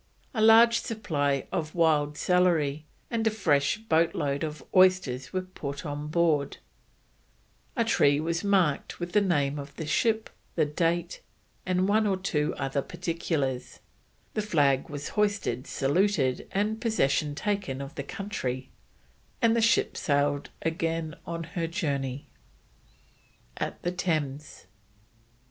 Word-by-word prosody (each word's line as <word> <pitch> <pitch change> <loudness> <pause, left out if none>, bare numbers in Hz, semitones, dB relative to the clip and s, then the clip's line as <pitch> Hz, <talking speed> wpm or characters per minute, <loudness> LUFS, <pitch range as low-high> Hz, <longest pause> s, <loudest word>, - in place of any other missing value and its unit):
A 220 - -1
large 230 +1 +7
supply 145 - -1
of 155 0 -3
wild 150 -3 +2
celery 160 -5 +2 0.2
and 225 -1 0
a - - +6
fresh 160 -10 +1
boat 170 -6 +1
load 140 0 -1
of 155 -1 -5
oysters 185 -9 +3
were 185 0 -1
put 145 -6 -7
on 145 0 -4
board; 155 -3 +1 1.2
a 230 -3 +1
tree 145 -10 +3
was 165 +3 -1
marked 185 -8 +1
with 175 0 -4
the 210 - +4
name 145 -7 +1
of 140 0 -9
the 160 - -5
ship, 220 +7 +1 0.2
the - - +3
date, 170 +3 -1 0.5
and 185 +1 +2
one 215 +1 +3
or 195 -2 +1
two 155 -6 -1
other 135 +1 -1
particulars, 145 -6 -3 0.5
the 215 - 0
flag 145 -10 +2
was 145 0 -5
hoisted, 205 - 0
saluted, 140 -2 +1
and 215 +3 -1
possession 150 - +1
taken 200 -8 -2
of 140 +2 -7
the 145 - -4
country, 130 -7 -4 0.7
and 230 -2 +3
the 230 - +2
ship 225 - +3
sailed 145 -1 0
again 165 -1 -2
on 165 0 -4
her 165 0 -3
journey. 140 -6 -3 1.3
AT - - -3
THE 175 - 0
THAMES. 155 - -3
165 Hz, 135 wpm, -28 LUFS, 145-190 Hz, 1.3 s, large